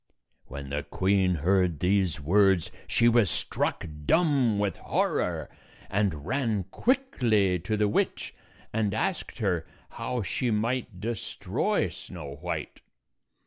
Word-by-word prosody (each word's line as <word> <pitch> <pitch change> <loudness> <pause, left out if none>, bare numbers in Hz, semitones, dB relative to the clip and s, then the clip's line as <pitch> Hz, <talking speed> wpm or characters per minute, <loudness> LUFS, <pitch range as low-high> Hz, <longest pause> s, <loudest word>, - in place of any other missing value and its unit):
When 70 +1 -7
the 75 +1 -1
queen 95 +4 +1
heard 90 0 +2
these 95 -2 +2
words, 95 +3 +3 0.2
she 115 - +3
was 115 -5 +4
struck - - -1 0.2
dumb 140 -10 +3
with 100 -1 0
horror, - - 0 0.4
and 95 -8 0
ran 115 -4 0
quickly 115 - +2
to 100 +6 -2
the 105 0 +3
witch 105 - -1 0.4
and 105 -2 0
asked 175 +10 -2
her 90 -8 0 0.2
how 125 -3 -3
she 120 +6 -1
might 115 -2 -1
destroy 110 +1 -1
Snow 75 -6 -9
White. - - -4
100 Hz, 120 wpm, -28 LUFS, 90-115 Hz, 0.4 s, was